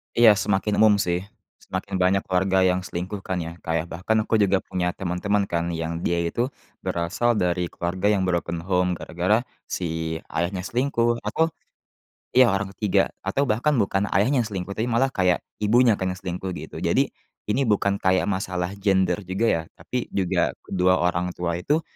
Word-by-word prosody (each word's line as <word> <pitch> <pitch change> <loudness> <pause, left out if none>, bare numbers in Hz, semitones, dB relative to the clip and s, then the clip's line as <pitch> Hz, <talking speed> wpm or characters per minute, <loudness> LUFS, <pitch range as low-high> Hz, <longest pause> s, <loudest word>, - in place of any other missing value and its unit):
Iya, 115 -2 +8
semakin 105 +1 0
umum, 110 -1 +6
sih. 90 -3 0 0.4
Semakin 95 +1 -5
banyak 95 +2 +3
keluarga 95 +1 +2
yang 90 0 +3
selingkuh, 90 +4 -4
kan, 95 -1 -3
ya. 85 - -6
Kayak 80 0 0
bahkan 95 +6 -1
aku 110 0 +1
juga 100 -2 +2
punya 90 -1 -2
teman-teman, 100 +3 0
kan, 85 0 0
yang 80 0 -3
dia 85 - +1
itu 120 +8 0 0.4
berasal 100 +8 0
dari 90 -3 0
keluarga 90 +4 -2
yang 95 -2 +1
broken 85 -2 -1
home 90 -1 +1
gara-gara 90 +8 0 0.2
si 80 -2 -3 0.2
ayahnya 90 +2 -1
selingkuh, 120 0 +1
atau, 160 0 +1 0.9
ya, 130 -2 +7
orang 95 0 -1
ke-3 105 -1 +2 0.2
atau 115 +9 +1
bahkan 120 +8 +2
bukan 100 -2 +1
ayahnya 125 +8 +2
yang 115 - -1
selingkuh 95 -1 -4
tapi 115 +3 -1
malah 120 +3 +2
kayak 90 -2 +2 0.2
ibunya, 115 +1 +4
kan, 95 -1 -1
yang 95 - -8
selingkuh, 95 0 -4
gitu. - - -8
Jadi, - - +2 0.3
ini 125 +6 0
bukan 100 -2 +2
kayak 95 0 +2
masalah 90 -2 -2
gender 95 -2 +2
juga, 95 +5 0
ya, 80 - +2
tapi 125 -1 -4
juga 90 -2 +1
kedua 90 -1 +2
orang 90 +1 0
tua 85 -1 -2
itu, 150 - +1
95 Hz, 170 wpm, -24 LUFS, 90-105 Hz, 0.9 s, Iya